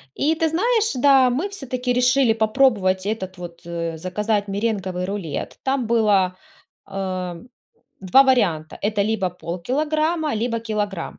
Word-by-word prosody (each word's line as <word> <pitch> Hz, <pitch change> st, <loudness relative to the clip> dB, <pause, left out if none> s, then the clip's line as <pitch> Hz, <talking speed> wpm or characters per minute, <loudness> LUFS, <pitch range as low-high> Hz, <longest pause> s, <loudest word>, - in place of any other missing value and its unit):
И 310 Hz, +3 st, +1 dB
ты 325 Hz, 0 st, +1 dB
знаешь, 440 Hz, +5 st, +1 dB
да, 265 Hz, -1 st, +5 dB
мы 305 Hz, +12 st, -1 dB
всё-таки 255 Hz, -9 st, -3 dB
решили 250 Hz, -1 st, +3 dB
попробовать 215 Hz, -5 st, +2 dB
этот 190 Hz, -4 st, -4 dB
вот, 170 Hz, -1 st, -9 dB
э, 170 Hz, -1 st, -4 dB
заказать 205 Hz, +4 st, -1 dB
меренговый 195 Hz, -3 st, -2 dB
рулет. 190 Hz, -7 st, -5 dB
Там 265 Hz, -2 st, 0 dB
было, 205 Hz, -5 st, +2 dB, 0.5 s
а, 185 Hz, -3 st, -4 dB, 0.6 s
2 190 Hz, +9 st, +6 dB
варианта: 195 Hz, -, +1 dB
это 205 Hz, 0 st, +1 dB
либо 205 Hz, -4 st, 0 dB
полкилограмма, 300 Hz, -, -1 dB
либо 230 Hz, +1 st, -1 dB
килограмм 210 Hz, -5 st, -4 dB
215 Hz, 130 wpm, -22 LUFS, 185-260 Hz, 0.6 s, 2